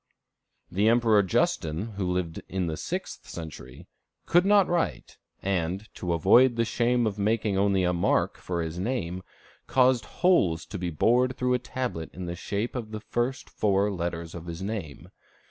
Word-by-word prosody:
The 100 +4 +2
Emperor 115 -2 +5
Justin, 85 0 0
who 95 -3 -2
lived 90 -3 -2
in 95 -1 -1
the 80 -2 -2
sixth - - -5
century, 75 -7 -9 0.4
could 175 +3 +4
not 200 -2 +5
write, 175 -1 -2 0.2
and, 95 +2 -1
to 90 -2 -2
avoid 120 +9 +5
the 115 0 +1
shame 120 +1 +1
of 105 -1 -2
making 105 0 +1
only 95 -1 +2
a 90 0 +2
mark 85 - +1
for 85 -2 -2
his 80 +2 -5
name, 95 -5 -2 0.5
caused 125 -3 +3
holes 135 - +2
to 100 - -7
be 90 -1 -2
bored 125 - +2
through 125 0 +1
a 125 - +2
tablet 125 -9 -4
in 90 - -5
the 85 0 -4
shape 100 +5 -3
of 115 -4 -4
the 110 0 -5
first 125 +4 -2
four 100 0 +1
letters 85 -2 -4
of 85 0 -8
his 85 +2 -6
name. 95 -9 -5
100 Hz, 170 wpm, -27 LUFS, 85-120 Hz, 0.5 s, Emperor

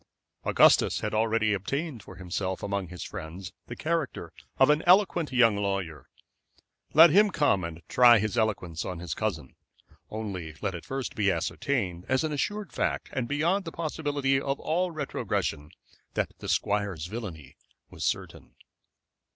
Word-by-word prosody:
Augustus - - +4
had - - -3
already 110 0 +2
obtained 135 - -3
for - - -12
himself 95 0 -4
among 100 -2 -2
his 90 -1 -7
friends 90 +5 -7
the 120 - -6
character 160 -1 -2 0.2
of 135 +2 +6
an 150 +1 +2
eloquent 180 -4 +4
young 115 -4 +4
lawyer. 95 -8 -3 0.9
Let 165 +1 +9
him 205 +5 +6
come 145 - +2
and 85 0 -7
try 120 -2 +7
his 110 +2 -1
eloquence 95 -7 -1
on 90 - -5
his 85 -2 -4
cousin, 80 -12 -3 0.6
only 95 -8 -5
let 95 -2 -2
it 85 - -7
first 135 -1 -4
be 100 -2 +2
ascertained, 90 - -2
as 130 +2 +2
an 155 -1 -1
assured 205 +7 -3
fact, - - -2
and 125 -3 -2
beyond 165 +8 +1
the 165 - -6
possibility 145 -4 -1
of 135 0 -2
all 180 +3 0
retrogression, 140 - -3 0.5
that - - 0
the - - -6
squire's 100 -6 0
villainy 90 - -7 0.4
was - - -7
certain. - - -3
110 Hz, 150 wpm, -28 LUFS, 95-145 Hz, 0.9 s, Let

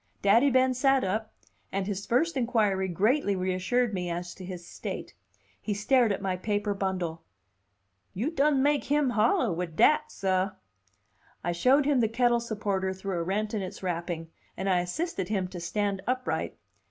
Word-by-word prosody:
Daddy 230 +8 +5
Ben 260 0 +3
sat 270 +1 +3
up, 215 +3 -2 0.4
and 195 0 -1
his 200 0 -4
first 315 +8 +2
inquiry 220 -7 +1
greatly 205 - +1
reassured 190 +6 0
me 180 -2 -2
as 175 +1 -4
to 190 - -11
his 180 -1 -7
state. - - -6 0.5
He 205 - -2
stared 235 +2 +3
at 200 - -3
my 185 -1 -1
paper 205 +1 -1
bundle. 185 -4 -2 0.9
"You 240 - -1
done 285 -3 +3
make 290 0 +2
him 290 -2 +2
hollah 225 -2 +2
wid 165 -1 -4
dat, 300 - +4
sah!" 190 0 0 0.9
I 175 - 0
showed 260 +11 +3
him 285 -2 +3
the 225 -2 +2
kettle 240 +1 +2
supporter 200 -4 -2
through 190 -2 -3
a - - -1
rent 210 +5 -1
in 215 - -1
its 185 0 -7
wrapping, 170 -2 -3 0.3
and 190 - -3
I 185 -2 +3
assisted 190 - -3
him 195 -4 0
to 180 -1 -7
stand 200 +3 -1
upright. 255 0 -1
200 Hz, 170 wpm, -28 LUFS, 185-245 Hz, 0.9 s, Daddy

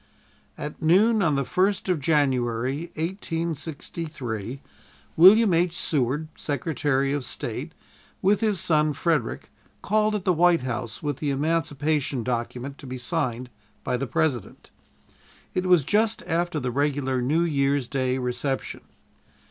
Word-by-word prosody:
At 150 - -6
noon 205 +7 +4
on 160 -6 +2
the 140 -1 0
first 190 +5 +1
of 180 -4 +1
January, 135 0 0
1863, 160 - -4 0.6
William 195 +4 +7
H. 175 +1 +1
Seward, 145 +1 0
Secretary 140 -3 -1
of 145 -2 -2
State, - - -5 0.5
with 200 +2 +3
his 215 -5 +1
son 155 -4 +2
Frederick, 150 -5 -1 0.3
called 215 +1 +2
at 200 - -3
the 185 - +4
White 175 0 +4
House 120 -2 -4
with 145 -3 -2
the 150 - -2
Emancipation 145 -2 0
document 125 +3 -4
to 135 - -10
be 130 0 -5
signed 125 -2 -2 0.3
by 125 - -1
the 130 +2 -2
President. 125 -2 -2 0.8
It 185 0 -1
was 180 -5 +5
just 215 - +1
after 170 -1 -1
the 125 -2 -2
regular 135 -1 0
New 150 +7 +2
Year's 140 -4 +1
Day 130 -1 0
reception. 130 +2 -3
150 Hz, 130 wpm, -25 LUFS, 130-170 Hz, 0.8 s, William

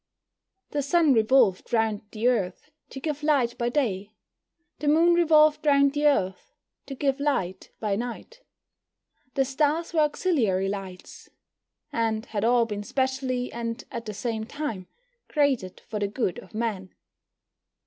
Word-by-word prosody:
The 290 - 0
Sun 300 +1 +3
revolved 220 -4 +3
round 220 -3 +1
the 225 +2 -1
Earth 225 +3 -1 0.2
to 270 - -8
give 300 0 -3
light 275 -6 +2
by 240 0 +1
day, 215 -7 -1 0.7
the 300 - -3
Moon 330 +4 +5
revolved 310 -3 +4
round 280 -2 +4
the 295 0 +2
Earth 190 -10 0 0.3
to 275 - -6
give 275 0 0
light 190 -11 -1
by 210 -2 0
night. 245 - -6 0.9
The 270 - +2
stars 300 +5 0
were 325 - +2
auxiliary 260 - +1
lights, 195 -2 -8 0.6
and 225 -1 0
had 210 -2 -3
all 235 0 +4
been 210 -2 -4
specially, 260 +1 -2
and 230 -1 -4
at 235 -1 -6
the 215 - -4
same 220 0 -3
time, 240 -11 -5 0.4
created 270 - 0
for 215 - -4
the 205 - 0
good 200 -3 -2
of - - -14
man. 210 -5 -3
245 Hz, 145 wpm, -26 LUFS, 215-290 Hz, 0.9 s, Moon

